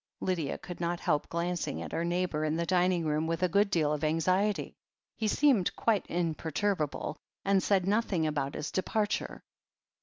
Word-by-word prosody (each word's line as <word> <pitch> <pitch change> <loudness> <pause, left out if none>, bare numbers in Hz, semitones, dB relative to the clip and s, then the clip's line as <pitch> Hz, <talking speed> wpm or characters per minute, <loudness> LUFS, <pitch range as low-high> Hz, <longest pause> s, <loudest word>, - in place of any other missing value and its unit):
Lydia 170 -6 -1
could 180 -1 -8
not 170 0 -1
help 150 -4 0
glancing 170 +1 -2
at - - -6
her 165 - -1
neighbour 175 -3 0
in 155 0 0
the 170 +1 0
dining 180 -1 +2
room 155 +1 0
with 165 +2 -1
a - - +5
good 200 +4 +3
deal 155 -5 +2
of 150 0 -3
anxiety. 185 +6 +1 0.4
He 220 - -1
seemed 240 -5 +3
quite 220 -4 +1
imperturbable, 160 -1 -1 0.3
and 195 -1 +3
said 190 -1 +2
nothing 200 -5 +1
about 145 -3 -1
his 150 - -4
departure. 210 +2 -1
175 Hz, 170 wpm, -30 LUFS, 160-195 Hz, 0.4 s, a